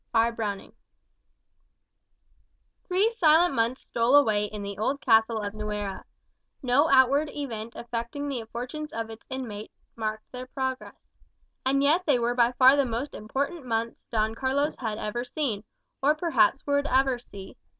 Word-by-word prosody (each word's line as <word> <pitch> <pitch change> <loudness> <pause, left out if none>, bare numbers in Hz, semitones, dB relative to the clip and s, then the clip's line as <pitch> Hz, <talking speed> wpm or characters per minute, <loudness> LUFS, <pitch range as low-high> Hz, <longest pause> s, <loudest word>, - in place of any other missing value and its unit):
R. 230 +1 +4
Browning 210 -4 -4 2.1
Three 390 +5 +2
silent 345 -5 +4
months 230 +3 0
stole 235 +4 +1
away 215 -8 +4
in 210 0 -6
the 200 0 -6
old 275 +6 0
castle 225 -2 +3
of 205 0 -4
Nuera. 210 -2 -4 0.6
No 270 +5 +3
outward 275 +3 +4
event 230 -6 -6
affecting 235 +4 -4
the 250 -5 -3
fortunes 300 +6 -5
of 225 0 -4
its 225 0 -12
inmates 225 -5 -6 0.2
marked 215 -1 -3
their 255 0 -7
progress. 260 0 -4 0.7
And 275 +1 +2
yet 330 +6 +2
they 285 -4 +4
were 240 0 0
by 240 0 +3
far 260 +2 +7
the 285 - +3
most 245 +3 -3
important 280 +9 -3
months 230 -1 -2
Don 220 -1 +1
Carlos 270 +5 0
had 220 -4 -3
ever 220 +3 -3
seen, 245 -5 -3 0.4
or 295 +3 +4
perhaps 335 -2 +2
would 285 0 +1
ever 260 -1 +2
see. 200 -5 -11
245 Hz, 150 wpm, -27 LUFS, 225-285 Hz, 2.1 s, far